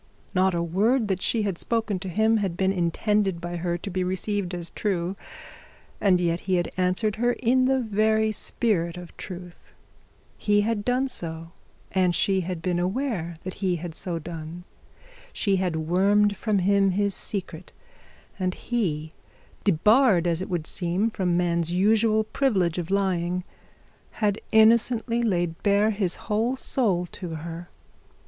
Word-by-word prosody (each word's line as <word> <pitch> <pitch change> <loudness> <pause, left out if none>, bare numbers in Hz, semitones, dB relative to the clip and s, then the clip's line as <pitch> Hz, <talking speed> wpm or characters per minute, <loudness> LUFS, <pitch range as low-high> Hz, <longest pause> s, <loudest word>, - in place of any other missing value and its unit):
Not 185 -1 +2
a 170 - 0
word 210 +7 +1
that 190 -1 -1
she 225 -2 +1
had 195 -4 -2
spoken 225 -4 0
to 190 0 -5
him 220 +5 +2
had 190 -5 -2
been 190 0 +2
intended 195 +1 0
by 175 0 -5
her 175 0 -1
to 185 - -7
be 185 +1 -1
received 185 0 -2
as 170 -1 -6
true, 185 -3 -2 0.8
and 190 -3 +3
yet 170 -1 0
he 185 0 -1
had 175 -1 -1
answered 185 +4 0
her 240 +2 +2
in 255 +2 +2
the 265 0 +2
very 220 -1 +1
spirit 185 -6 -1
of 175 -1 -10
truth. 180 -2 -10 0.7
He 205 0 +3
had 210 -1 -1
done 250 +3 +1
so, 165 -8 -5 0.4
and 180 -2 +2
she 190 -1 +2
had 180 -2 -5
been 175 -1 0
aware 185 - -2
that 185 - -5
he 185 -2 +1
had 170 0 -5 0.3
done 165 +1 -7
so. - - -30 0.3
She 200 -3 +1
had 180 -3 -1
wormed 200 +6 +2
from 215 0 0
him 195 +1 +3
his 200 +1 +1
secret; 185 -4 -4 0.7
and 185 -1 -1
he, 160 -10 -2 0.5
debarred 205 - +4
as 170 0 0
it 185 - -5
would 175 -4 -2
seem 185 +7 0
from 180 -5 0
man's 170 -1 0
usual 215 +4 +3
privilege 195 -9 0
of 170 0 -5
lying, 180 -2 0 0.7
had 210 -1 0
innocently 230 +1 +4
laid 175 -7 -1
bare 205 +1 +3
his 195 -4 0
whole 225 +5 0
soul 205 -9 +2
to 175 -4 -6
her. 170 +2 -7
190 Hz, 155 wpm, -25 LUFS, 175-215 Hz, 0.8 s, debarred